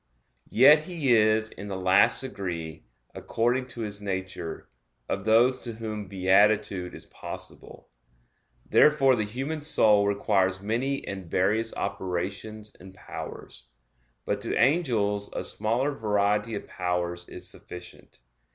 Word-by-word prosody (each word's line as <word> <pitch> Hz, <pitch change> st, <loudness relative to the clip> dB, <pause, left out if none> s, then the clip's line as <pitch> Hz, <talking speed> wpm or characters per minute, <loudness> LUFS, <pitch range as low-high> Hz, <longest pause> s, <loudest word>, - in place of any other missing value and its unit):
Yet 150 Hz, +6 st, +6 dB
he 160 Hz, -8 st, +1 dB
is 110 Hz, 0 st, +3 dB
in 100 Hz, -, -9 dB
the 95 Hz, -2 st, -4 dB
last 95 Hz, +2 st, +4 dB
degree, 90 Hz, -, -5 dB, 0.3 s
according 120 Hz, +3 st, -1 dB
to 120 Hz, -2 st, -6 dB
his 105 Hz, -2 st, -4 dB
nature, 95 Hz, -4 st, -5 dB, 0.4 s
of 95 Hz, +1 st, -3 dB
those 120 Hz, +4 st, +4 dB
to 120 Hz, -, -3 dB
whom 110 Hz, -2 st, -5 dB
beatitude 95 Hz, 0 st, +2 dB
is -, -, -9 dB
possible; -, -, -9 dB, 0.8 s
therefore 135 Hz, -3 st, +5 dB
the 110 Hz, -3 st, -1 dB
human 135 Hz, +8 st, -4 dB
soul 105 Hz, -9 st, +4 dB
requires 95 Hz, -2 st, +1 dB
many 120 Hz, +7 st, -2 dB
and 95 Hz, -3 st, -6 dB
various 105 Hz, +6 st, +1 dB
operations 100 Hz, +4 st, -4 dB
and 95 Hz, +1 st, -14 dB
powers. -, -, -9 dB, 0.6 s
But -, -, -1 dB
to -, -, -2 dB
angels 115 Hz, -8 st, +1 dB
a -, -, -3 dB
smaller 115 Hz, +7 st, 0 dB
variety 105 Hz, -2 st, 0 dB
of 100 Hz, -, -6 dB
powers 90 Hz, -1 st, -3 dB
is -, -, -6 dB
sufficient. 90 Hz, -7 st, -11 dB
105 Hz, 125 wpm, -27 LUFS, 95-120 Hz, 0.8 s, Yet